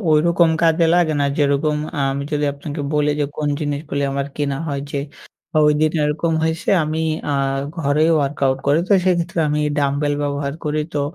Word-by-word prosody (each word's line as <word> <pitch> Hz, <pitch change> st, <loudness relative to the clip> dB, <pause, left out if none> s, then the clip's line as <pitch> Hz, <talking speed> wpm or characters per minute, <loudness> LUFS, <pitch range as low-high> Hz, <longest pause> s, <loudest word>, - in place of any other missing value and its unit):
ওইরকম 170 Hz, +2 st, +4 dB
কাজে 165 Hz, 0 st, +4 dB
লাগে 170 Hz, -3 st, +3 dB
না। -, -, +2 dB
যেরকম 145 Hz, +1 st, +2 dB, 0.3 s
আমি 140 Hz, +1 st, -3 dB
যদি 150 Hz, 0 st, 0 dB
আপনাকে 145 Hz, +1 st, -6 dB
বলি 150 Hz, 0 st, +2 dB
যে, -, -, +2 dB
কোন 150 Hz, -1 st, -1 dB
জিনিসগুলি 145 Hz, -1 st, -3 dB
আমার 140 Hz, 0 st, -2 dB
কেনা 140 Hz, -2 st, -1 dB
হয় 140 Hz, -1 st, -2 dB
যে, 140 Hz, -, -2 dB, 0.7 s
ওইদিন 150 Hz, +1 st, +2 dB
এরকম 160 Hz, +2 st, 0 dB
হইছে, 160 Hz, +1 st, -2 dB, 0.2 s
আমি 155 Hz, +1 st, -2 dB, 0.3 s
আ -, -, +1 dB, 0.5 s
ঘরেই 155 Hz, +2 st, +2 dB
workout 135 Hz, -1 st, 0 dB
করি, 145 Hz, +3 st, +4 dB
তো -, -, +3 dB
সেক্ষেত্রে 170 Hz, -2 st, 0 dB
আমি 150 Hz, +1 st, 0 dB, 0.2 s
dumbbell 145 Hz, +1 st, 0 dB
ব্যবহার 140 Hz, 0 st, -2 dB
করি, 150 Hz, 0 st, 0 dB
তো 145 Hz, -, +1 dB
150 Hz, 165 wpm, -20 LUFS, 140-160 Hz, 0.7 s, ওইরকম